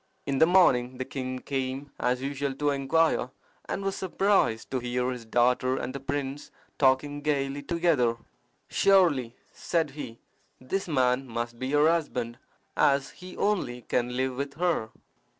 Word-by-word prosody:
In 135 -1 -1
the 160 - +6
morning 130 -9 +4
the 130 - -3
king 130 -1 -4
came 135 +1 -4
as 125 +1 0
usual 140 0 -2
to 145 +1 +1
inquire, 140 0 +1 0.4
and 195 - -2
was 195 0 -1
surprised 190 - +1
to 130 - 0
hear 125 +1 -1
his 125 -2 -7
daughter 125 +3 +2
and 130 - -4
the 140 - -5
prince 140 +1 -4 0.3
talking 145 +2 +2
gaily 140 -1 -1
together. 145 -7 +1 0.5
"Surely," 165 -12 +3 0.2
said 165 -4 -1
he, 130 -5 -7 0.4
"this 185 +10 -3
man 130 -3 +1
must 120 0 -4
be 130 - -3
her 150 +1 +5
husband, 125 -8 -1 0.4
as 140 -1 +2
he 180 0 -11
only 125 - -1
can 125 0 -1
live 130 0 0
with 140 +2 -4
her." 170 -9 0
135 Hz, 150 wpm, -27 LUFS, 125-150 Hz, 0.5 s, the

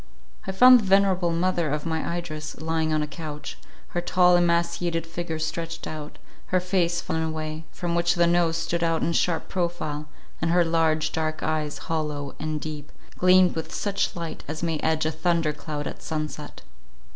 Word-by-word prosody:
I - - -1
found 250 +6 +8
the - - -3
venerable 190 -2 +3
mother 170 -1 +1
of 150 +2 -2
my 165 +1 -1
Idris 155 -3 -6
lying 160 0 0
on 155 -1 +1
a - - -3
couch, 150 -2 -7 0.3
her 175 - -2
tall 180 0 +4
emaciated 170 -1 +1
figure 165 -1 -4
stretched 165 +1 -4
out; 150 -1 -7 0.3
her 185 - +2
face 175 -2 +1
fallen 160 - -2
away, 155 0 -4
from 175 -1 -3
which 170 +1 +2
the 170 0 +4
nose 170 -1 +2
stood 170 +1 -1
out 165 -1 +1
in 170 - +1
sharp 165 -1 +1
profile, 170 -5 -2 0.3
and 165 - +1
her 175 0 +4
large 160 -1 +2
dark 155 -1 -2
eyes, 155 -1 -1
hollow 150 -3 -3
and 155 0 -2
deep, 150 -1 -7 0.3
gleamed 185 0 +6
with 160 - -4
such 200 -1 -1
light 170 -2 -5
as 155 +2 -5
may 165 -2 0
edge 160 0 +1
a 160 - +1
thunder 165 -1 +1
cloud 150 0 -5
at - - -6
sun 155 -1 -2
set. 150 0 -10
165 Hz, 180 wpm, -25 LUFS, 155-175 Hz, 0.3 s, found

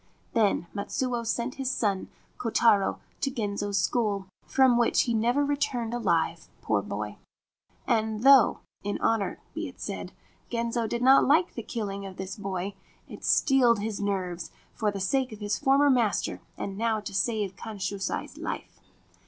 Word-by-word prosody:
Then 210 -6 +2
Matsuo 240 +4 -2
sent 235 +2 -2
his 260 - 0
son 205 -7 -1 0.3
Kotaro 220 -4 +3 0.2
to 275 - 0
Genzo's 205 -5 -2
school, 200 -1 +1 0.2
from 260 -2 +4
which 235 -1 +3
he 235 - -1
never 240 +6 +2
returned 280 -5 -1
alive, 240 -1 0
poor - - +1
boy; - - -5 0.7
and 220 -2 0
though 270 -4 +7 0.2
(in 205 0 -2
all - - +3
honour 205 -5 -1
be - - -3
it - - -12
said) - - -5 0.4
Genzo 235 -1 -1
did 235 +2 -2
not 265 +2 +7
like 320 +5 +4
the 235 - -5
killing 200 -4 -4
of 190 - -10
this 190 0 -5
boy, 195 -1 -4 0.3
he - - -10
steeled 250 -4 +4
his 205 0 -3
nerves, 185 -4 -2 0.2
for 215 - 0
the 200 -1 -4
sake 255 +7 0
of 215 - -9
his 205 -1 -1
former 280 0 +4
master 235 -5 +1 0.2
and 195 0 -5 0.3
to - - -5
save 200 -1 0
Kanshusai's 200 -2 -4
life. - - -5
225 Hz, 155 wpm, -27 LUFS, 200-245 Hz, 0.7 s, though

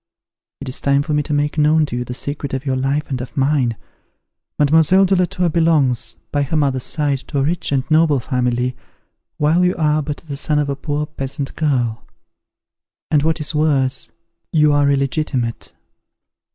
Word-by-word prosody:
It 140 - -6
is 130 - -3
time 140 0 +2
for 150 - -3
me 150 - +2
to 150 - -6
make 145 +1 0
known 155 +1 +4
to 130 - -5
you 125 - -2
the 125 0 -6
secret 140 0 -4
of 135 +1 -5
your 135 -2 0
life 140 +3 -1
and 130 -2 -2
of 125 - -9
mine. 135 -4 +1 0.8
Mademoiselle 160 +6 +4
de 190 +1 +2
la 180 0 +3
Tour 180 0 -1
belongs, 155 -7 +1 0.2
by 145 - +1
her 140 +3 -1
mother's 135 -3 +1
side, 145 -3 0
to 145 - -4
a 135 - +2
rich 165 +2 -1
and 135 -2 +1
noble 155 -3 +4
family, 125 0 -1 0.6
while 160 +4 +3
you 180 0 +2
are 155 -2 +2
but 145 0 -4
the 140 - -4
son 150 +1 +1
of 145 -1 0
a 140 - -1
poor 145 +1 -3
peasant 135 -1 -5
girl; 125 -7 0 1.1
and 150 - +4
what 160 +2 0
is 150 +1 -3
worse 140 -4 +1 0.4
you 150 -2 +4
are 145 -1 +3
illegitimate." 135 -3 -1
145 Hz, 185 wpm, -19 LUFS, 135-155 Hz, 1.1 s, known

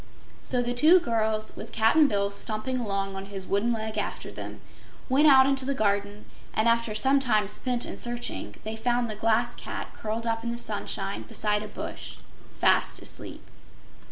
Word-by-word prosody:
So 250 -1 0
the 245 0 -1
two 315 +9 +7
girls, 220 -6 -1
with 225 - -8
Cap'n 225 +8 +4
Bill 200 -4 0
stumping 220 +5 -3
along 195 -3 -2
on 195 0 -6
his 195 -1 -3
wooden 200 +5 +1
leg 220 -1 -2
after - - -4
them, - - -8 0.5
went 280 +4 +5
out 265 -2 +8
into 270 -1 +2
the 275 +1 -1
garden, 205 -1 -1 0.3
and 220 - +2
after 230 -2 +2
some 270 +5 +4
time 215 -6 +2
spent 245 +4 0
in - - -7
searching, 240 0 -2
they 220 +1 -4
found 240 +1 0
the - - -2
Glass 225 +3 +1
Cat - - -7
curled 220 +2 -4
up 225 0 -1
in 235 - -2
the 235 - -4
sunshine 240 - -4
beside 210 -1 0
a 215 - -6
bush, - - -7 0.4
fast - - +2
sleep. - - -6
225 Hz, 180 wpm, -27 LUFS, 215-245 Hz, 0.5 s, out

